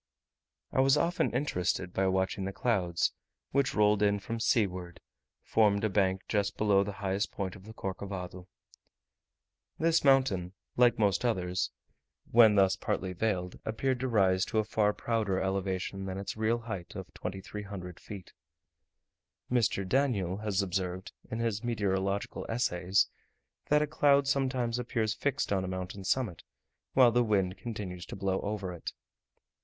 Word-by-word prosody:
I -, -, 0 dB
was 135 Hz, +2 st, +5 dB
often 170 Hz, +4 st, +1 dB
interested 90 Hz, -, -1 dB
by 95 Hz, 0 st, +1 dB
watching 95 Hz, +1 st, 0 dB
the 95 Hz, -, -2 dB
clouds, 95 Hz, -6 st, 0 dB, 0.4 s
which, 135 Hz, 0 st, +1 dB
rolling 105 Hz, -1 st, +4 dB
in 100 Hz, 0 st, +1 dB
from 115 Hz, +2 st, -5 dB
seaward, 90 Hz, -6 st, 0 dB, 0.4 s
formed 105 Hz, -2 st, +3 dB
a 110 Hz, -, +2 dB
bank 95 Hz, -1 st, +1 dB
just 100 Hz, -2 st, 0 dB
beneath 100 Hz, -2 st, +3 dB
the -, -, -2 dB
highest 95 Hz, 0 st, -1 dB
point 95 Hz, -3 st, -4 dB
of 95 Hz, -1 st, -14 dB
the 110 Hz, -, -10 dB
Corcovado. 95 Hz, -2 st, -5 dB, 1.3 s
This 165 Hz, +1 st, +2 dB
mountain, 130 Hz, -10 st, +3 dB, 0.2 s
like 120 Hz, -1 st, +5 dB
most 100 Hz, -1 st, +2 dB
others, 90 Hz, -6 st, 0 dB, 0.6 s
when 110 Hz, -2 st, +7 dB
thus 95 Hz, -1 st, +4 dB
partly 95 Hz, -1 st, -2 dB
veiled, 90 Hz, -2 st, -2 dB
appeared 125 Hz, +4 st, -1 dB
to 130 Hz, -, -1 dB
rise 95 Hz, -5 st, +3 dB
to -, -, -3 dB
a 110 Hz, -, +4 dB
far 105 Hz, -1 st, +2 dB
prouder 105 Hz, -4 st, -1 dB
elevation 95 Hz, 0 st, -2 dB
than 95 Hz, 0 st, -4 dB
its 100 Hz, -, -4 dB
real 110 Hz, +2 st, +1 dB
height 100 Hz, -7 st, -6 dB
of -, -, -8 dB
2300 95 Hz, -1 st, -6 dB
feet. 100 Hz, -4 st, -10 dB, 1.2 s
Mr. 110 Hz, -6 st, +1 dB
Daniell 100 Hz, -7 st, +1 dB
has 105 Hz, -2 st, 0 dB
observed, 95 Hz, +1 st, -3 dB, 0.2 s
in 110 Hz, -, -3 dB
his 115 Hz, -2 st, -1 dB
meteorological 100 Hz, -4 st, -1 dB
essays, 95 Hz, -5 st, +2 dB, 0.6 s
that 150 Hz, 0 st, +4 dB
a -, -, +1 dB
cloud 140 Hz, -2 st, +3 dB
sometimes 130 Hz, -4 st, 0 dB
appears 115 Hz, -3 st, -1 dB
fixed 125 Hz, -2 st, -1 dB
on 95 Hz, -1 st, +1 dB
a -, -, -3 dB
mountain 95 Hz, +1 st, -5 dB
summit, 105 Hz, -2 st, 0 dB, 0.5 s
while 125 Hz, -3 st, +6 dB
the 120 Hz, +1 st, +3 dB
wind 100 Hz, -4 st, +1 dB
continues 100 Hz, -6 st, -6 dB
to -, -, -7 dB
blow 95 Hz, -1 st, -1 dB
over 100 Hz, -3 st, -3 dB
it. 85 Hz, -, -6 dB
100 Hz, 150 wpm, -30 LUFS, 95-115 Hz, 1.3 s, when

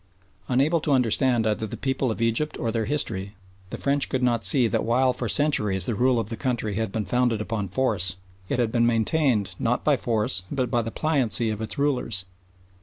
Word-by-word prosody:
Unable 140 Hz, +7 st, +2 dB
to 145 Hz, -, +1 dB
understand 125 Hz, -1 st, +2 dB
either 110 Hz, 0 st, -1 dB
the -, -, -7 dB
people 135 Hz, -1 st, -1 dB
of 115 Hz, +1 st, -2 dB
Egypt 115 Hz, +7 st, 0 dB
or 115 Hz, -, -2 dB
their 110 Hz, -1 st, -1 dB
history, 100 Hz, -6 st, -2 dB, 0.3 s
the -, -, -5 dB
French 140 Hz, 0 st, 0 dB
could 130 Hz, -1 st, -1 dB
not 120 Hz, -2 st, +1 dB
see 115 Hz, +5 st, +3 dB
that 105 Hz, -, 0 dB
while 125 Hz, +2 st, +2 dB
for 120 Hz, -2 st, -3 dB
centuries 105 Hz, -, +1 dB
the 120 Hz, -, -1 dB
rule 125 Hz, +3 st, +2 dB
of 115 Hz, -, -3 dB
the 115 Hz, -, -3 dB
country 115 Hz, -3 st, -2 dB
had 110 Hz, 0 st, -2 dB
been 110 Hz, -1 st, -2 dB
founded 120 Hz, +2 st, +1 dB
upon 105 Hz, -2 st, -3 dB
force, 95 Hz, -4 st, 0 dB, 0.3 s
it -, -, 0 dB
had 120 Hz, -3 st, +1 dB
been 120 Hz, -1 st, +2 dB
maintained 115 Hz, -, +1 dB
not 120 Hz, +1 st, 0 dB
by 150 Hz, -, +4 dB
force 115 Hz, -4 st, 0 dB
but 130 Hz, -4 st, -1 dB
by 120 Hz, -, +2 dB
the 115 Hz, -, -4 dB
pliancy 120 Hz, -6 st, 0 dB
of 105 Hz, 0 st, -5 dB
its 110 Hz, -, -5 dB
rulers. 125 Hz, -9 st, 0 dB
115 Hz, 205 wpm, -25 LUFS, 110-130 Hz, 0.3 s, by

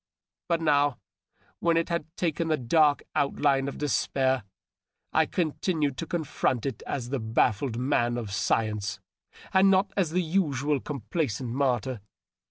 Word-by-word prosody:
But 170 Hz, -1 st, +1 dB
now, 145 Hz, -3 st, +3 dB, 0.6 s
when 170 Hz, -1 st, +2 dB
it 165 Hz, -, 0 dB
had 170 Hz, -3 st, -2 dB
taken 170 Hz, -1 st, 0 dB
the 155 Hz, -1 st, +2 dB
dark 145 Hz, +3 st, +3 dB
outline 140 Hz, -1 st, +1 dB
of 140 Hz, -, -5 dB
despair, 130 Hz, -4 st, 0 dB, 0.7 s
I 160 Hz, -1 st, +4 dB
continued 155 Hz, -4 st, -1 dB
to 165 Hz, -, -4 dB
confront 150 Hz, -7 st, -1 dB
it 135 Hz, -6 st, -3 dB
as 125 Hz, -4 st, -3 dB
the 135 Hz, 0 st, -1 dB
ba£9ed 110 Hz, +2 st, +1 dB
man 120 Hz, -2 st, +1 dB
of 110 Hz, -4 st, -5 dB
science 105 Hz, 0 st, 0 dB, 0.5 s
and 190 Hz, +1 st, +6 dB
not 195 Hz, +1 st, +3 dB
as 190 Hz, -5 st, +1 dB
the 180 Hz, +3 st, 0 dB
usual 150 Hz, -5 st, +1 dB
complaisant 130 Hz, -, -3 dB
martyr. 130 Hz, -3 st, 0 dB
140 Hz, 140 wpm, -27 LUFS, 125-160 Hz, 0.7 s, and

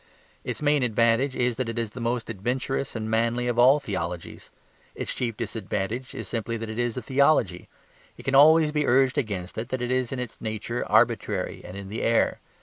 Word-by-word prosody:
Its -, -, -5 dB
main 145 Hz, -1 st, +3 dB
advantage 115 Hz, +3 st, +2 dB
is 120 Hz, -2 st, 0 dB
that 125 Hz, -2 st, -2 dB
it 115 Hz, -, -5 dB
is 115 Hz, -2 st, -2 dB
the 125 Hz, -, -9 dB
most 120 Hz, 0 st, -2 dB
adventurous 125 Hz, +6 st, -2 dB
and 110 Hz, -1 st, -3 dB
manly 115 Hz, +2 st, +1 dB
of 120 Hz, -1 st, 0 dB
all 130 Hz, +4 st, +6 dB
theologies. 90 Hz, -, -5 dB, 0.5 s
Its -, -, -3 dB
chief 115 Hz, -3 st, -3 dB
disadvantage 110 Hz, +1 st, -4 dB
is -, -, -6 dB
simply 115 Hz, 0 st, -2 dB
that 115 Hz, 0 st, -5 dB
it 110 Hz, -, -5 dB
is 120 Hz, 0 st, -1 dB
a 125 Hz, -, -4 dB
theology. 135 Hz, -, +2 dB, 0.5 s
It -, -, -11 dB
can 135 Hz, -, -1 dB
always 155 Hz, +2 st, +7 dB
be 150 Hz, -1 st, 0 dB
urged 130 Hz, +1 st, +3 dB
against 100 Hz, -6 st, -4 dB
it 115 Hz, +2 st, -5 dB
that 130 Hz, -, -2 dB
it 125 Hz, 0 st, -2 dB
is 130 Hz, -2 st, 0 dB
in 135 Hz, -, -3 dB
its 125 Hz, -2 st, -6 dB
nature 110 Hz, +2 st, -3 dB
arbitrary -, -, +1 dB
and 90 Hz, -, -9 dB
in 100 Hz, -1 st, -8 dB
the 110 Hz, -, -4 dB
air. 115 Hz, 0 st, +2 dB
120 Hz, 205 wpm, -26 LUFS, 110-130 Hz, 0.5 s, always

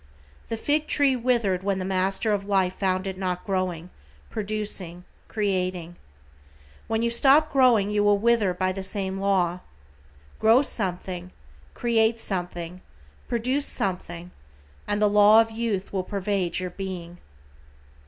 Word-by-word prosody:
The 225 Hz, -, -2 dB
fig 300 Hz, +5 st, 0 dB
tree 280 Hz, -3 st, +2 dB
withered 230 Hz, -7 st, 0 dB
when 195 Hz, 0 st, -1 dB
the 185 Hz, -, -3 dB
Master 190 Hz, +3 st, 0 dB
of 200 Hz, -1 st, -1 dB
Life 190 Hz, -2 st, +1 dB
found 185 Hz, -1 st, -1 dB
it 190 Hz, -1 st, -5 dB
not 180 Hz, -2 st, -3 dB
growing, 185 Hz, -3 st, -2 dB, 0.4 s
producing, 205 Hz, -5 st, -3 dB, 0.2 s
creating. 185 Hz, -5 st, -2 dB, 0.9 s
When 225 Hz, 0 st, -1 dB
you 235 Hz, -, +1 dB
stop 280 Hz, +6 st, +5 dB
growing 240 Hz, -7 st, +4 dB
you 210 Hz, 0 st, +1 dB
will 205 Hz, 0 st, +4 dB
wither 225 Hz, -2 st, +2 dB
by 185 Hz, +1 st, -1 dB
the 195 Hz, +1 st, -5 dB
same 190 Hz, 0 st, -1 dB
law. 185 Hz, -3 st, +1 dB, 0.8 s
Grow 230 Hz, +5 st, +5 dB
something, 180 Hz, -6 st, -2 dB, 0.5 s
create 230 Hz, -1 st, +1 dB
something, 180 Hz, -3 st, -4 dB, 0.5 s
produce 255 Hz, +4 st, 0 dB
something 180 Hz, -2 st, -4 dB, 0.6 s
and 205 Hz, -, -1 dB
the 210 Hz, -, +4 dB
law 210 Hz, +1 st, +6 dB
of 225 Hz, 0 st, +2 dB
youth 220 Hz, -4 st, -3 dB
will 190 Hz, -2 st, -1 dB
pervade 195 Hz, -3 st, -2 dB
your 180 Hz, -1 st, -3 dB
Being. 175 Hz, -2 st, -7 dB
195 Hz, 135 wpm, -25 LUFS, 185-225 Hz, 0.9 s, law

